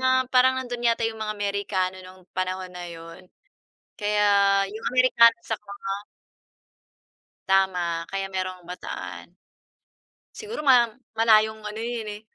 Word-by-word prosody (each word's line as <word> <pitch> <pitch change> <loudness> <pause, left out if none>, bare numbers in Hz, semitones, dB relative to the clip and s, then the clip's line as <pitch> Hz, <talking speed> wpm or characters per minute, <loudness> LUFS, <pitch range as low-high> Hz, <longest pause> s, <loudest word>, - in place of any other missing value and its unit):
na 260 - +2 0.2
parang 260 +1 +5
nando'n 245 -2 -3
yata 230 0 +1
'yong 220 -1 -3
mga 215 0 -3
Amerikano 200 -2 -1
nong 185 0 -14
panahon 185 0 -3
na 175 -1 -7
'yon. 165 +2 -11 0.7
Kaya, 210 0 +1 0.4
'yong 215 +3 -8
Amerikano, 240 -2 +5
saka 220 -2 -3
nga 195 -1 -4 1.5
Tama, 180 -3 +1
kaya 195 0 -2
merong 185 -2 -5
Bataan. 180 0 -7 1.1
Siguro 435 -5 -6
ma 255 -5 +6 0.3
malayong 220 -1 +3
ano 210 +1 -5
yun 230 -2 -4
eh. 205 - -8
205 Hz, 125 wpm, -25 LUFS, 185-230 Hz, 1.5 s, ma